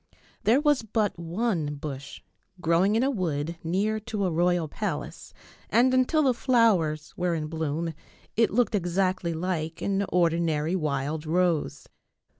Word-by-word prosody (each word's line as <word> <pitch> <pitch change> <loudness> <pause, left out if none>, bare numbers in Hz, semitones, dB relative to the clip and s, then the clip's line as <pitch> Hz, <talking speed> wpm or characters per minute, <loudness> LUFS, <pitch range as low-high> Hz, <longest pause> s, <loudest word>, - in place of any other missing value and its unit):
There 235 +5 +5
was 295 -2 +3
but 215 -4 -1
one 170 -3 -1
bush 140 -1 -7 0.4
growing 175 +5 +2
in 230 - +3
a 275 - +2
wood 165 - -2
near 200 +6 0
to 210 -2 -3
a 180 - 0
royal 175 0 +1
palace, 210 +8 -5 0.4
and 255 +2 +4
until 255 +5 +3
the 260 -3 +3
flowers 215 - +2
were 175 -1 0
in 155 -2 -2
bloom 160 +1 -3 0.4
it 230 0 +3
looked 230 0 +1
exactly 185 -2 0
like 165 -1 -3
an 200 0 +1
ordinary 165 -2 +1
wild 150 -1 -2
rose. 170 -1 0
175 Hz, 140 wpm, -27 LUFS, 160-215 Hz, 0.4 s, There